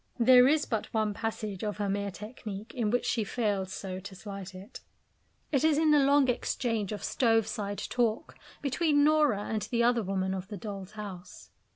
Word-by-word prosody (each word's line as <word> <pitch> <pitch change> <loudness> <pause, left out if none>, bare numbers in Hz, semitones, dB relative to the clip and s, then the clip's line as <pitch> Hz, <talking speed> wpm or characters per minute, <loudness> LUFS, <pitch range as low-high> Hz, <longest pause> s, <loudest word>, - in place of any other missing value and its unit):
There 250 +1 +7
is 300 +1 +3
but 220 -3 -3
one 215 -1 +1
passage 215 -2 -4
of 210 -1 -2
her 205 -1 -1
mere 200 +1 -1
technique 210 0 -8
in 235 -5 0
which 245 +3 0
she 230 - +1
fails 200 -4 -1
so 185 -1 -5
to 190 0 -9
slight 195 -1 -8
it. 195 +6 -10 0.7
It 280 -1 +2
is 315 -2 +4
in 315 0 +4
the 295 - +6
long 280 0 +4
exchange 230 -4 -1
of 210 - -5
stove 225 -3 +2
side 205 -2 -4
talk 235 -2 -1 0.3
between 290 +1 +2
Nora 295 -9 +3
and 215 0 -2
the 235 -1 +1
other 240 0 +3
woman 190 -1 -1
of 190 0 -5
"The 205 0 -7
Doll's 200 -2 -7
House." 195 -4 -9
215 Hz, 190 wpm, -29 LUFS, 200-250 Hz, 0.7 s, There